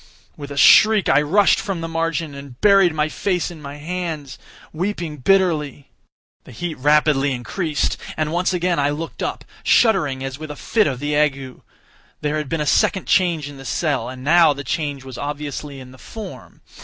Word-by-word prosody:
With 145 -1 -9
a 140 - -7
shriek, 215 +6 +6
I 145 - +5
rushed 190 +7 +3
from 195 -4 -4
the 165 - -3
margin, 165 -2 -2
and 140 -3 -11
buried 195 -3 +5
my 155 -1 0
face 180 +2 -2
in 160 -3 -11
my 140 0 -8
hands—weeping 165 +1 -5
bitterly. 150 -3 +1 0.5
The - - -14
heat 170 +7 -4
rapidly 145 -1 +3
increased, 145 +5 -2 0.2
and 155 -1 -1
once 180 +3 0
again 180 -2 0
I 140 0 +2
looked 155 +3 -5
up, - - -4 0.2
shuddering 145 - +2
as 135 +1 -5
with 155 -1 -7
a 150 - -6
fit 215 +7 +1
of 130 -2 -3
the 145 0 -1
ague. 140 -3 -1 0.6
There 150 +1 -1
had 150 -3 -4
been 165 -2 -1
a - - -1
second 190 +6 +2
change 170 -6 +1
in 145 -1 -10
the 135 - -10
cell—and 130 -2 -2
now 165 +1 +5
the 140 0 -7
change 145 0 -3
was 130 -1 -9
obviously 145 -1 -5
in 130 -1 -12
the 130 - -16
form. 220 - -10
150 Hz, 180 wpm, -20 LUFS, 140-175 Hz, 0.6 s, shriek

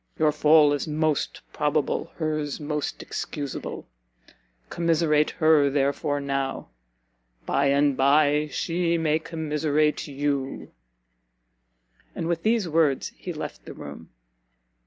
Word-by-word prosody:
Your 155 -1 +3
fall 150 0 +5
is 145 - -2
most 155 -1 -1
probable, 150 +2 0
her's 155 -3 -2
most 150 -1 -3
excusable; 145 -3 -5 0.8
commiserate 160 -3 +2
her 155 -3 +4
therefore 140 +1 0
now, 135 -1 -3 0.8
by 140 +1 +1
and 140 0 +3
by 145 +2 +3
she 170 +2 0
may 160 -1 +1
commiserate 155 -2 -1
you?" 140 -1 -3 1.4
And 165 - -3
with 170 -1 -1
these 220 -2 +1
words 155 -4 +1
he - - -6
left - - -7
the - - -9
room. - - -10
150 Hz, 110 wpm, -25 LUFS, 145-160 Hz, 1.4 s, fall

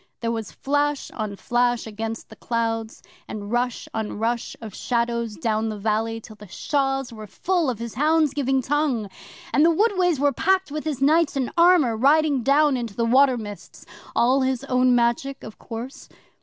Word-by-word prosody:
There 230 -1 -1
was 225 -2 -4
flash 290 0 -1
on 215 -3 -4
flash 240 +2 0
against 225 +1 -6
the - - -12
clouds, 225 -1 -3 0.2
and 205 -1 -7
rush 245 0 -1
on 220 -2 -3
rush 230 +2 -2
of 220 -3 -9
shadows 235 -1 -1
down 220 0 -1
the 215 - -5
valley 220 +2 -1
till 220 -1 -13
the 210 0 -12
shaws 270 - -1
were 215 -1 -9
full 345 - 0
of 245 - -2
his 230 0 -6
hounds 305 0 +2
giving 270 -2 0
tongue, 260 -7 0 0.4
and 290 - +4
the 330 - +6
woodways 365 -2 +2
were 285 0 +2
packed 380 +3 +1
with 305 +1 -4
his 280 -4 -2
knights 310 0 +3
in 260 -3 -1
armour 340 -9 +5
riding 285 +3 +3
down 280 +2 +3
into 230 -4 -5
the 230 - 0
water 260 +2 +4
mists 205 -3 -9 0.3
all 255 +3 +3
his 260 -1 -1
own 255 -2 +3
Magic, 240 +3 0
of 220 - -10
course. 235 +4 -8
245 Hz, 180 wpm, -23 LUFS, 225-285 Hz, 0.4 s, the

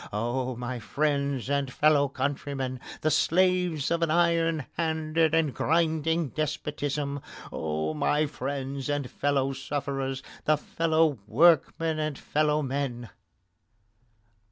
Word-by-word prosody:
Oh, 120 +4 -1
my 120 +1 -4
friends 140 0 -1
and 140 -2 0
fellow 145 0 +4
countrymen, 135 -2 -3 0.2
the 155 - +2
slaves 180 -2 +2
of 170 0 +1
an 165 - +2
iron 165 -2 +2
handed 160 -1 +1
and 165 -2 +3
a - - -7
grinding 160 0 +1
despotism! 145 -1 -2 0.3
Oh, 80 0 -2
my 150 - +1
friends 135 0 -4
and 145 -2 -1
fellow 135 -1 0
sufferers, 135 -1 -3 0.2
and 155 -1 +4
fellow 160 -4 +1
workmen 160 +4 +3
and 155 -3 -2
fellow 150 0 +1
men! 130 -5 -3
145 Hz, 115 wpm, -27 LUFS, 135-160 Hz, 0.3 s, fellow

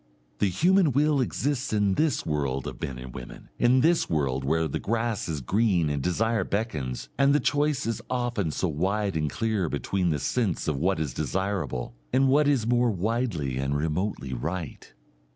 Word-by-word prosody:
The 100 - +3
human 175 - +3
will 145 +1 +3
exists 135 +1 -1
in 105 -2 +2
this 155 +7 +1
world 70 -4 -1
of - - -7
men 65 - -4
and 65 0 -9
women, - - -10
in 125 +2 +4
this 165 +3 +3
world 70 -4 0
where 80 +4 +1
the 70 - -3
grass 115 -3 -1
is 75 -3 -2
green 90 - +2
and 70 -1 -1
desire 110 +7 +1
beckons 75 - -3
and 140 +1 +5
the - - +4
choice 145 -1 +1
is 115 -1 -2
often 120 -8 -1
so 90 - -1
wide 95 +5 -1
and 75 -1 0
clear 110 -5 -1
between 90 +5 -1
the 75 - +1
sense 100 - -1
of 75 - +1
what 90 +1 +1
is 75 -5 -2
desirable 85 -7 -2 0.2
and 130 +1 +3
what 145 +2 +4
is 135 -6 +2
more 120 +1 +3
widely 100 - -1
and 70 +2 0
remotely 75 -2 -2
right. 80 +5 -5
95 Hz, 180 wpm, -27 LUFS, 75-120 Hz, 0.2 s, and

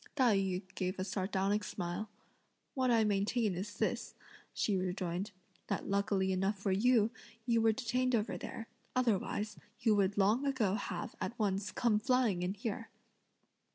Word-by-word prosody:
Tai 250 -7 +4
yü 190 -1 0
gave 185 +1 -2
a 185 - -1
sardonic 195 +2 0
smile. 180 +3 -4 0.6
"What 260 -2 +1
I 230 -2 +5
maintain 210 +1 +1
is 200 +4 -5
this," - - -1 0.4
she 205 - 0
rejoined, 185 +1 -2 0.4
"that - - -2
lucky 200 -1 +1
enough 195 +2 +1
for 195 0 -1
you, 225 +2 +4 0.3
you 230 -2 +3
were 225 0 +5
detained 250 +2 +1
over 215 -1 0
there; 225 - -6 0.3
otherwise, 215 -3 0 0.2
you 230 -4 +3
would 200 -1 +2
long 210 +7 +3
ago 260 -9 +1
have, 195 -4 -3
at 235 - -3
once, 200 -2 0
come 225 -3 +2
flying 230 -5 +2
in 180 +2 -1
here!" 225 +2 -4
205 Hz, 155 wpm, -34 LUFS, 190-230 Hz, 0.6 s, I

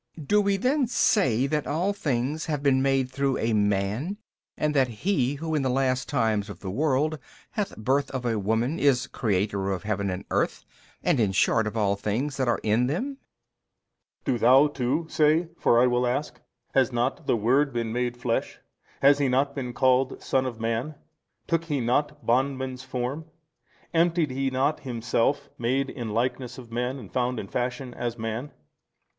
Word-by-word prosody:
Do 210 +7 +4
we 200 -1 +1
then 260 +5 +1
say 135 - +2
that 150 +1 -1
all 175 +7 0
things 145 -2 -2
have 150 -3 -2
been 135 -2 +3
made 135 -1 +1
through 135 0 0
a 115 0 0
man 105 - 0 0.4
and 150 0 0
that 135 -2 +4 0.2
he 145 -9 +2
who 160 +2 -4
in 150 - +2
the 130 - 0
last 130 0 0
times 110 -6 0
of 100 - -8
the 95 - -4
world 150 +5 +1 0.3
hath 205 -3 -3
birth 135 +5 +1
of 130 -2 -4
a 115 -3 0
woman 115 - 0
is 135 -3 +3
Creator 100 -2 -1
of 95 -1 -2
heaven 100 -2 -1
and 90 +1 -4
earth - - 0 0.4
and 135 - +2
in 105 -4 +2
short 110 +3 +3
of 105 - -4
all 100 -2 +2
things 115 +8 -2
that 130 -2 0
are 120 - +2
in 110 +4 +2
them? 265 - -3
A. - - -52
Do 125 - +1
thou 130 +5 +6
too 145 +3 -1
say, 160 +2 +2
for 120 - +4
I 125 - +5
will 125 0 +2
ask: 140 +5 -2 0.3
Has 135 -1 +3
not 130 +6 -1
the - - +3
Word 135 +6 +2
been 115 -2 -2
made 120 0 -1
flesh? 120 -1 -2 0.5
has 140 +1 +6
He 140 - +2
not 135 +2 +1
been 130 -3 -4
called 130 +2 +2
son 130 -1 +1
of 120 -3 -6
man? 115 +7 -2 0.5
took 165 -1 0
He 145 -4 -1
not 145 +5 0
bondman's 130 +1 0
form? 130 +4 -4 0.7
emptied 165 -3 +2
He 135 +1 0
not 135 +4 0
Himself, 120 +2 -1
made 130 +3 0
in 120 -4 -5
likeness 125 +3 -2
of 120 -3 -11
men 125 +3 -2
and 110 -8 -11
found 125 -1 0
in 100 - -6
fashion 125 +2 -3
as 120 -1 -4
man? 115 +5 -4
130 Hz, 185 wpm, -26 LUFS, 115-145 Hz, 0.7 s, thou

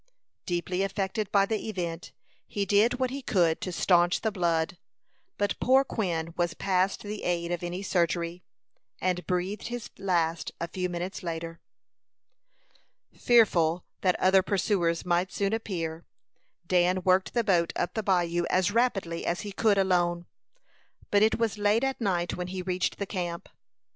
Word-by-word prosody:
Deeply 180 +1 -1
affected 195 +1 -2
by 200 -1 +4
the 220 +1 -3
event, 170 -5 -4 0.4
he 200 -1 -2
did 210 +5 +3
what 255 0 -1
he 275 +1 -4
could 175 -9 +1
to 185 - -3
stanch 175 +1 +3
the 220 - 0
blood; 170 -3 0 0.6
but 205 0 -1
poor 265 +2 +5
Quin 170 -10 -2
was 175 -1 -1
past 190 0 0
the 210 0 -5
aid 170 -1 -1
of 175 - -2
any 175 +2 -4
surgery, 170 -1 0 0.6
and 180 -1 -1
breathed 185 +3 -2
his 240 -1 -6
last 170 -4 0
a 170 - -2
few 180 +1 -3
minutes 175 +2 -4
later. 165 -1 -5 1.6
Fearful 180 -8 +3 0.2
that 185 -2 +2
other 190 +1 +5
pursuers 185 -4 0
might 180 +1 +1
soon 200 +1 -1
appear, 170 -7 -4 0.6
Dan 180 +1 +2
worked 185 +4 +2
the 235 - +3
boat 175 -6 +2
up - - -1
the 220 - -1
bayou 175 -3 +1
as 185 +2 +2
rapidly 200 -8 0
as 175 - -1
he 205 - -6
could 205 0 +2
alone; 175 -2 +1 0.9
but 205 - +4
it 220 +1 +4
was 225 -2 -1
late 205 +4 +2
at 270 -1 -1
night 175 -5 0
when 180 0 -4
he 185 0 -5
reached 185 0 -1
the 200 - -3
camp. 175 -3 -4
185 Hz, 160 wpm, -28 LUFS, 175-205 Hz, 1.6 s, poor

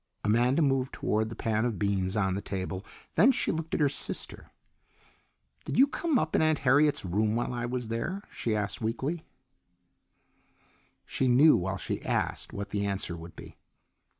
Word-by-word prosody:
Amanda 120 +8 +3
moved 135 -2 +1
toward 110 +1 0
the 115 - -7
pan 110 -1 0
of 120 -4 -1
beans 100 -1 0
on 95 -3 +1
the 100 - -2
table, 95 -1 -4 0.3
then 260 - +6
she - - 0
looked 160 0 -3
at - - -1
her 150 - +4
sister. 140 - -3 1.2
"Did - - -3
you 270 - +8
come 300 +1 0
up 155 -8 0
in - - +3
Aunt 155 -1 +3
Harriet's 145 -1 +4
room 105 +4 +1
while 120 +1 -1
I 120 -1 -2
was 125 -2 -3
there?" 170 - -3
she 110 -2 -2
asked 100 0 -2
weakly. 135 +9 -2 1.8
She 130 - -1
knew 140 +6 +6
while 95 +1 -1
she - - -4
asked - - -2
what 100 0 -5
the 100 0 -1
answer 95 -3 -2
would 85 0 -10
be. - - -12
115 Hz, 175 wpm, -29 LUFS, 100-145 Hz, 1.8 s, you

